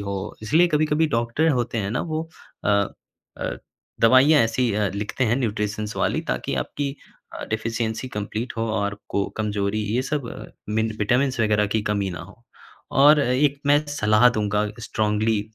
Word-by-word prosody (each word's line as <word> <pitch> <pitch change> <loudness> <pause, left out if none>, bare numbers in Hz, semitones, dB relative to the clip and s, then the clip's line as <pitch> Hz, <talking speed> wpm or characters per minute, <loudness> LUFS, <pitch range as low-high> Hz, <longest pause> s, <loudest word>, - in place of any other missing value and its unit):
हो। 100 -1 -5
इसलिए 160 +12 +4
कभी-कभी 155 0 +2
डॉक्टर 120 +6 +1
होते 120 -1 -2
है 100 -2 -2
ना 125 - -1
वो 160 +1 -2 0.4
अ - - 0 0.7
अ, - - -3 0.4
दवाइयाँ 130 +6 +6
ऐसी 115 0 +1
अ, 105 -1 +1
लिखते 105 +5 -2
हैं 120 +2 +2
न्यूट्रिशंस 105 -3 -2
वाली - - 0
ताकि - - -2
आपकी 140 -1 -4 0.4
अ, - - -6
डेफिशिएंसी 115 +2 -2
कंप्लीट 110 +2 -4
हो 115 0 -1
और 100 -1 -1
को 100 - 0
कमजोरी 105 -1 -1
ये 125 - +1
सब 140 -3 -3
अ, - - -8 0.3
मिन 110 0 +1
विटामिन्स 125 +4 +1
वग़ैरह 105 -1 +2
की 110 - 0
कमी 100 -2 -1
ना 85 - -6
हो। 100 +7 -14 0.6
और 150 +1 +7
एक 140 +2 +1
मैं 145 +1 +5
सलाह 110 -4 +4
दूँगा 105 -2 0
स्ट्रांगली, 110 -1 0
115 Hz, 160 wpm, -23 LUFS, 105-130 Hz, 0.7 s, और